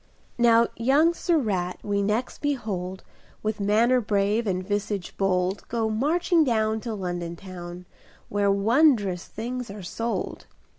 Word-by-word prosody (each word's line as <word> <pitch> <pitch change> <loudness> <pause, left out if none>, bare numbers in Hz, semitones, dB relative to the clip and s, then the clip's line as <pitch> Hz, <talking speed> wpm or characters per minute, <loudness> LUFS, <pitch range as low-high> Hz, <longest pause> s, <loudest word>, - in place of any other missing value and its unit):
Now 235 -1 +6
young 280 +8 +4
Sir 340 0 +1
Rat 185 - -1
we 200 -1 0
next 210 +5 -1
behold, 200 -10 -3 0.4
With 215 0 -2
manner 225 +5 +3
brave 205 +1 +1
and 185 -1 -1
visage 205 -2 -2
bold, 190 0 0
Go 225 -2 -1
marching 320 +8 +2
down 220 -4 +1
To 230 -2 -4
London 175 -3 -4
town, 180 -1 -9 0.4
Where 205 0 +1
wondrous 205 - +3
things 245 +2 -5
are 200 -1 -8
sold. 230 +6 -4
210 Hz, 135 wpm, -25 LUFS, 190-235 Hz, 0.4 s, Now